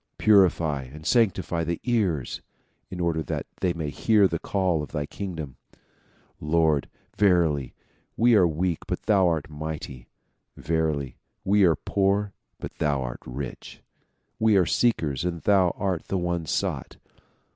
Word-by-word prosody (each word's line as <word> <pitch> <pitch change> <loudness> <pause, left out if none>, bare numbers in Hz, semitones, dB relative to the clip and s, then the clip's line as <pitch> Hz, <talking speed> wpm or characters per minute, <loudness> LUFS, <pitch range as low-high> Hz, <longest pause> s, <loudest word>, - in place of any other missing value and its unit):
Purify 85 -8 +3
and 75 +4 -12
sanctify 95 -7 +1
the 85 +1 -2
ears 100 - -1 0.5
in 90 - -7
order 85 -2 0
that - - -4
they 90 - +1
may 80 -4 -4
hear 105 +4 +3
the 85 -3 -3
call 95 -5 0
of 75 - -7
thy 75 -2 -2
kingdom. 80 -7 -6 0.8
Lord! 75 -2 +1 0.3
verily 85 -9 +2 0.4
we 120 +1 +4
are 95 -5 +6
weak 85 +1 -1
but - - -3
thou 100 -4 +3
art 80 -4 -1
mighty. 75 -5 -7 0.5
Verily 75 -6 -1 0.3
we 100 0 +4
are 85 -3 +4
poor 100 +4 0 0.2
but - - -7
thou 70 -3 +1
art - - -6
rich. 65 +1 -7 0.6
We 110 -2 +4
are 90 - +4
seekers 80 - +1
and 85 -2 -3
thou 95 -3 +4
art 95 -4 -2
the 95 - -1
one 85 -2 -2
sought. - - -2
85 Hz, 145 wpm, -25 LUFS, 75-95 Hz, 0.8 s, are